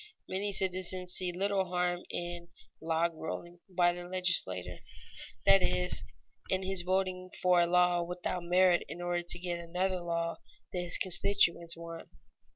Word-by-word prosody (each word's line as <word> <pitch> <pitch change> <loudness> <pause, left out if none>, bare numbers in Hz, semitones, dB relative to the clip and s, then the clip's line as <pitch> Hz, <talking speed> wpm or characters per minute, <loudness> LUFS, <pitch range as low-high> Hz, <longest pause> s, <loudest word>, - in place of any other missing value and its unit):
Many 200 +2 -2
citizens 185 -1 -2
see 180 -1 -1
little 195 +2 +1
harm 180 0 0
in 175 0 -4 0.3
"log 165 +1 +1
rolling" 175 +2 -6
by 175 -1 +3
the 175 0 -7
legislator, 180 - 0 0.7
that 195 -1 +7
is, 180 0 +1 0.5
in 190 0 0
his 190 -1 +2
voting 185 0 -1
for 180 -1 +4
a 170 - +3
law 180 0 +4
without 180 +1 -3
merit 180 0 +4
in - - -6
order 175 0 -1
to 175 0 -3
get 175 -1 -3
another 180 +2 -1
law 170 -1 -2 0.4
that 180 - -1
his 175 -1 0
constituents 170 -3 +2
want. 165 0 -8
180 Hz, 150 wpm, -32 LUFS, 175-185 Hz, 0.7 s, that